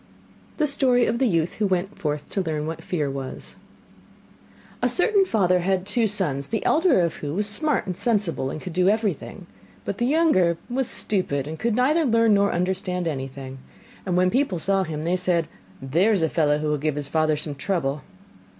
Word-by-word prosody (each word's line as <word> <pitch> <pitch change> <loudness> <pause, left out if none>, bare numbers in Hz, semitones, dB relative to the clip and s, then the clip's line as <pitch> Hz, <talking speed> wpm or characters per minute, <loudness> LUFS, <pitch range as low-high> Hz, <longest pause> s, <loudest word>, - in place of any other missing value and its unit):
THE 305 - +2
STORY 255 -4 +2
OF 235 +1 -1
THE 265 - +3
YOUTH 165 -4 0
WHO 210 - +1
WENT 185 +1 -1
FORTH 150 -5 -3
TO 195 - -1
LEARN 155 -4 -3
WHAT 165 +1 -6
FEAR 155 -5 -2
WAS 135 -1 -7 1.3
A - - +2
certain 395 +1 +3
father 185 - +2
had 185 +1 0
two 225 +2 +1
sons, 150 -10 -1
the 225 - -3
elder 325 - +3
of 170 -1 -1
who 145 +1 -5
was 205 +2 +1
smart 265 +8 +1
and 185 - -4
sensible, 200 - 0
and 155 - -5
could 180 +2 -7
do 180 +2 +3
everything, 205 -3 -2 0.4
but 200 - -4
the 240 - +1
younger 265 - +3
was 260 0 +1
stupid 145 -9 -1
and 155 +2 -7
could 230 -1 0
neither 290 +7 +3
learn 230 -4 +3
nor 200 0 +3
understand 180 0 -2
anything, 135 -2 -6 0.4
and 180 -2 -1
when 185 0 +3
people 255 -7 +1
saw 195 +4 +1
him 155 -4 -4
they 170 +2 +1
said: 175 -3 0 0.4
'There's 175 +8 +2
a 160 - +2
fellow 150 -2 +2
who 150 0 -2
will 150 -1 0
give 150 0 -1
his 145 -1 -4
father 155 0 +1
some 150 0 -3
trouble! 145 -2 -2
180 Hz, 195 wpm, -24 LUFS, 155-220 Hz, 1.3 s, THE